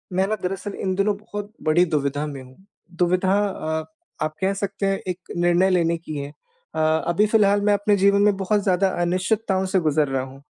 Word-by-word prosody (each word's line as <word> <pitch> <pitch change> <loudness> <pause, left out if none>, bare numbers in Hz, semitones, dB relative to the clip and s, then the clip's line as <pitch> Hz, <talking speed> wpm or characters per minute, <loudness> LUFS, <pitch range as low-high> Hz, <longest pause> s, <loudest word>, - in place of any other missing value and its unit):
मैं 190 +1 +2
ना 215 - 0
दरअसल 195 +2 -3
इन 190 - 0
दिनों 200 +2 +1
बहुत 205 0 -7
बड़ी 155 +3 +4
दुविधा 145 -2 -1
में 140 -2 -7
हूँ। 130 0 -15 0.4
दुविधा 185 +1 +2 0.2
अ, 160 -4 -3 0.4
आप 155 0 -5
कह 190 +1 +1
सकते 200 0 -3
हैं 195 0 +1
एक 180 0 -6
निर्णय 175 +2 +3
लेने 170 -2 +2
की 165 -2 -8
है 140 0 -5 0.5
अ, - - -1
अभी 160 +5 +2
फिलहाल 205 -2 +3
मैं - - +5
अपने 205 +1 +2
जीवन 200 +1 +4
में 205 -1 +4
बहुत 200 +1 0
ज़्यादा 190 0 +2
अनिश्चितताओं 190 +2 0
से 190 - +4
गुजर 155 -2 +1
रहा 135 -1 -1
हूँ। 135 +1 -11
185 Hz, 200 wpm, -23 LUFS, 160-200 Hz, 0.5 s, मैं